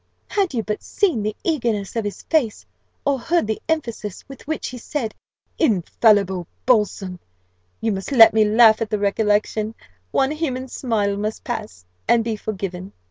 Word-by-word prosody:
Had 385 -9 0
you 225 - 0
but 210 0 -3
seen 355 - 0
the 210 0 -2
eagerness 235 - -1
of 210 -3 -1 0.2
face, 270 -10 +1 0.4
or 280 -2 +1
heard 340 +4 +1
the 220 0 -3
emphasis, 235 - -3
with 275 0 -12
which 315 0 -2
he 250 - -8
said 235 -2 -3 0.5
'infallible 200 - +2 0.2
balsam' 205 -6 +1 0.6
you 225 - +1
must 195 +5 -4
let 230 -5 +8
me 220 -1 +5
laugh 220 +1 +6
at 225 - -1
the 215 - 0
recollection. 210 +1 0 0.3
One 270 - +1
human 265 -5 -3
smile 210 -6 -1
must 215 +1 -3
pass, 215 - -5 0.2
and 235 -1 +4
be 225 -1 -2
forgiven." 195 -3 -5
220 Hz, 155 wpm, -22 LUFS, 205-255 Hz, 0.6 s, let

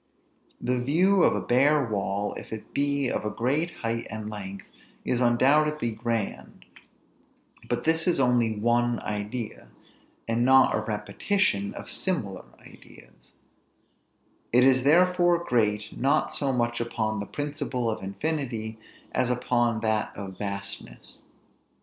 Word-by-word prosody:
The 125 0 0
view 180 +9 +3
of - - +4
a 105 - -1
bare 135 +8 +3
wall, 100 -2 -2
if - - -9
it 110 -1 -8
be 140 -1 +1
of - - -2
a 105 - -1
great 140 +10 0
height 115 0 -2
and 110 0 -6
length, 100 -2 -7 0.4
is 125 - 0
undoubtedly 140 +2 +3
grand; 110 - -4 1.0
but - - -1
this 160 +1 +2
is 175 - +2
only 120 -4 +2
one 120 +2 +1
idea, 105 - -5 0.6
and 115 +1 +1
not 130 +1 +6
a - - +1
repetition 105 - -1
of - - -8
similar 110 - -3 0.2
ideas: - - -17 1.2
it 125 +1 +5
is 130 -1 +4
therefore 175 +2 +4
great, 105 -5 0
not 135 +2 +1
so 140 -2 0
much 120 -2 0
upon 110 -2 -2
the 100 - -5
principle 145 -4 -3
of 110 -3 -2
infinity, 110 0 -3 0.3
as 125 -1 0
upon 120 -2 +1
that 110 -1 -1
of 95 -2 -7
vastness. 100 0 -7
120 Hz, 130 wpm, -26 LUFS, 110-140 Hz, 1.2 s, not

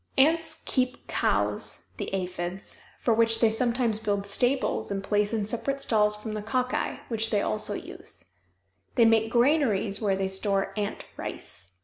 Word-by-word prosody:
Ants 315 +3 +2
keep 255 -1 -1
cows - - 0
the - - -4
aphides 185 0 -4 0.2
for 235 - +2
which 225 0 +3
they 225 -2 +4
sometimes 235 -1 +1
build 205 -2 -1
stables 245 +6 +1
and 195 -1 -2
place 205 +1 +1
in 220 -3 0
separate 275 +6 -1
stalls 210 -5 +2
from 215 +1 -6
the 215 - -3
cocci, 250 +4 -1
which 225 -1 +2
they 205 -2 +1
also 105 - +1
use. 85 +1 -8 0.7
They 235 - +6
make 225 0 +4
granaries 235 -5 +2
where 200 -3 +2
they 190 0 -1
store 195 0 0
ant 205 -1 -3
rice. 90 +1 -6
215 Hz, 155 wpm, -27 LUFS, 195-240 Hz, 0.7 s, They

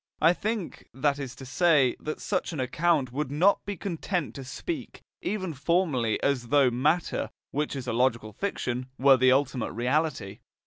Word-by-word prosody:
I 165 +3 +5
think, 215 0 -4
that 140 +1 +1
is 135 -3 -6
to 135 - -10
say, 140 -1 +3
that 155 - -5
such 185 -3 -2
an 155 - -4
account 140 +1 +1
would 140 +1 -2
not 175 +8 +3
be 200 -2 -4
content 175 -2 -3
to 135 - -7
speak, 315 - -6 0.2
even 190 -5 -2
formally, 135 - +1
as 130 -4 +1
though 140 -1 +4
matter, 150 +8 0 0.2
which 150 0 -2
is 130 -2 -5
a 120 - -2
logical 115 -3 +1
fiction, 125 - -3
were 135 0 +6
the 130 0 +5
ultimate 135 -2 +1
reality. 125 -4 -1
140 Hz, 170 wpm, -27 LUFS, 125-170 Hz, 0.2 s, were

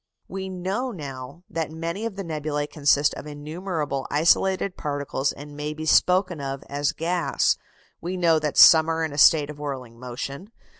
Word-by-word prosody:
] - - -60
We 190 0 -5
know 190 +7 -3
now 140 - -8
that 165 -1 -3
many 170 +7 -4
of 215 - -8
the 195 - -5
nebulæ 150 -3 -3
consist 145 -1 +3
of - - -8
innumerable 150 -1 -4
isolated 185 +5 +2
particles 145 -2 -2
and 145 +1 -11
may 150 +1 -4
be 155 0 -6
spoken 180 0 +3
of 135 0 -5
as 145 0 -1
gas. 170 +1 0 0.5
We 180 +2 -4
know 165 -3 +3
that 150 -1 -3
some 160 0 +8
are 165 0 0
in 155 -2 -3
a 145 - -3
state 150 -1 +6
of 145 - -12
whirling 130 -5 -6
motion. 135 - -7
155 Hz, 180 wpm, -24 LUFS, 145-175 Hz, 0.5 s, some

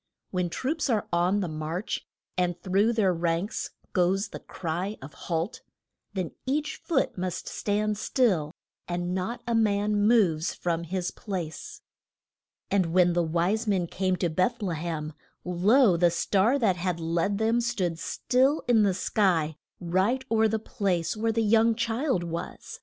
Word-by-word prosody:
When 180 -2 0
troops 285 - -2
are 220 -4 +1
on 180 +4 +2
the 185 - -1
march, 155 +5 -4 0.3
and 180 -1 0
through 195 +5 +2
their 200 -5 +2
ranks 170 +3 -1 0.2
goes 190 +3 +2
the - - -7
cry 180 +5 -4
of 135 +2 -10
Halt! 170 +6 -3 0.5
then 185 -4 -2 0.2
each 295 +3 -1
foot 330 - -1
must 185 -1 -3
stand 210 0 -1
still, 185 - +1 0.4
and 175 0 -2
not 190 +6 -3
a 235 - -1
man 210 -2 +2
moves 180 -9 +3
from 170 -1 -2
his 180 +1 -2
place. 175 -7 -6 0.9
And 190 -3 +3
when 175 +1 +4
the 175 - +2
wise 175 +7 0
men 190 -4 +2
came 185 +2 -1
to 175 -1 0
Beth 185 +7 0
le 180 -4 -1
hem, 155 -1 -4 0.3
lo, 190 +4 +4
the 175 0 +4
star 200 +8 +2
that 205 -9 +2
had 175 -1 -2
led 170 +5 0
them 225 +2 +2
stood 185 -9 -1
still 265 - +1
in 235 -3 +5
the 195 -3 +2
sky, 175 -7 +1 0.2
right 190 +9 +1
o'er 220 -1 +4
the 220 +1 0
place 185 -5 -1
where 225 +1 0
the 225 0 +1
young 225 +1 +4
child 230 - 0
was. 170 0 -6
185 Hz, 160 wpm, -27 LUFS, 170-220 Hz, 0.9 s, in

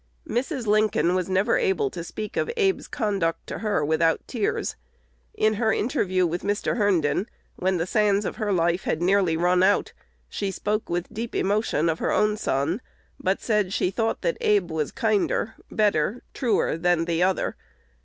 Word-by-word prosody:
Mrs. 255 +1 -2
Lincoln 210 -4 +2
was 185 0 -1
never 190 +2 +2
able 175 -8 +1
to 170 - -6
speak 215 +4 -6
of - - 0
Abe's 390 -3 +1
conduct 200 -8 -1
to - - -6
her 210 -9 0
without 160 +1 +1
tears. 225 -6 -2 0.6
In 215 0 +2
her 220 +1 +1
interview 185 -6 +1
with 175 +1 -2
Mr. 205 +3 -1
Herndon, 195 -2 +1 0.3
when 185 0 +1
the 165 - -1
sands 205 +1 +2
of - - -4
her 215 -3 -1
life 175 0 +1
had - - 0
nearly 180 -2 +2
run 180 +2 +3
out, 195 +2 +2 0.3
she 195 - -3
spoke 210 +2 -2
with 175 0 -3
deep 230 +2 -5
emotion 200 -5 +1
of 160 0 0
her - - 0
own 210 0 +2
son, 160 - -1 0.4
but 190 +1 0
said 210 -4 0
she 180 - +1
thought 225 +3 -1
that 165 - 0
Abe 200 -5 +2
was 155 -2 -2
kinder, 220 -1 0 0.2
better, 210 +1 +1
truer, 235 - +1
than 175 -1 +2
the 170 0 0
other. 185 +1 +1
195 Hz, 175 wpm, -25 LUFS, 175-215 Hz, 0.6 s, run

